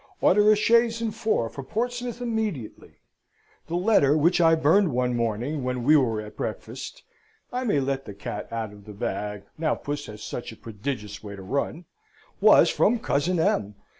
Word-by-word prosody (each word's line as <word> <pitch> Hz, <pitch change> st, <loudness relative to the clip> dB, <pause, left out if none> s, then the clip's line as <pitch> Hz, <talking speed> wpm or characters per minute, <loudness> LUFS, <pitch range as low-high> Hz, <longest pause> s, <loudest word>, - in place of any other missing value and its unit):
Order 210 Hz, +3 st, +5 dB
a -, -, +6 dB
chaise 230 Hz, +2 st, +3 dB
and 225 Hz, -2 st, -2 dB
four 220 Hz, -, 0 dB
for 135 Hz, -, -8 dB
Portsmouth 245 Hz, -, -3 dB
immediately! 220 Hz, -, -4 dB, 0.7 s
The 170 Hz, -, -3 dB
letter 175 Hz, -7 st, +4 dB
which 170 Hz, +4 st, +3 dB
I 165 Hz, -1 st, +6 dB
burned 160 Hz, +4 st, +3 dB
one 125 Hz, 0 st, 0 dB
morning 120 Hz, +5 st, -2 dB
when 125 Hz, -1 st, -2 dB
we 150 Hz, +5 st, +5 dB
were 120 Hz, -7 st, +2 dB
at 105 Hz, 0 st, -10 dB
breakfast -, -, -6 dB, 0.5 s
(I 250 Hz, +1 st, -2 dB
may 205 Hz, -11 st, +2 dB
let 135 Hz, 0 st, -2 dB
the 100 Hz, -, -9 dB
cat 100 Hz, -, -6 dB
out 110 Hz, -2 st, -4 dB
of 100 Hz, -1 st, -15 dB
the 105 Hz, -, -9 dB
bag, 100 Hz, 0 st, -4 dB, 0.2 s
now 155 Hz, -2 st, +1 dB
puss 145 Hz, 0 st, -5 dB
has 105 Hz, -1 st, -9 dB
such 120 Hz, -, -5 dB
a -, -, -11 dB
prodigious 105 Hz, -2 st, -6 dB
way 100 Hz, -1 st, -7 dB
to 95 Hz, -, -10 dB
run) 140 Hz, -, -3 dB, 0.5 s
was -, -, +6 dB
from 240 Hz, -, +3 dB
cousin 175 Hz, -4 st, 0 dB
M. 105 Hz, -10 st, +1 dB
140 Hz, 180 wpm, -25 LUFS, -, 0.7 s, a